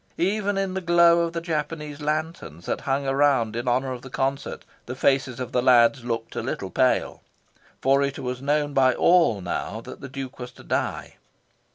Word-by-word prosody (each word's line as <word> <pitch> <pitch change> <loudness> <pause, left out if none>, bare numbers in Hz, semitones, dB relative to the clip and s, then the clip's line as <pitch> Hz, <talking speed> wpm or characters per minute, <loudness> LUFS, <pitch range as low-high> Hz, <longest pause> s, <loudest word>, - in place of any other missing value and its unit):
Even 205 +2 0
in 195 -1 -1
the 190 - -3
glow 170 -1 +5
of 170 -1 0
the 170 - -3
Japanese 150 -2 -4
lanterns 150 - -3
that - - -2
hung 135 0 -1
around 135 -5 +2
in 120 +2 -4
honour 130 +2 +1
of 125 -1 -6
the 135 - -10
concert, 135 +2 -3 0.2
the 125 - -5
faces 135 -2 +1
of 125 - -5
the 125 - +1
lads 120 0 +4
looked 115 -1 -4
a - - -2
little - - -4
pale. - - +1 0.6
For 135 +1 +4
it 140 0 -1
was 125 0 -4
known 145 +1 0
by 130 -2 +4
all 170 - +4
now 95 +4 -4
that - - -11
the 140 - -7
Duke 135 -1 -7
was 125 0 -7
to - - -15
die. - - -3
135 Hz, 195 wpm, -24 LUFS, 125-155 Hz, 0.6 s, glow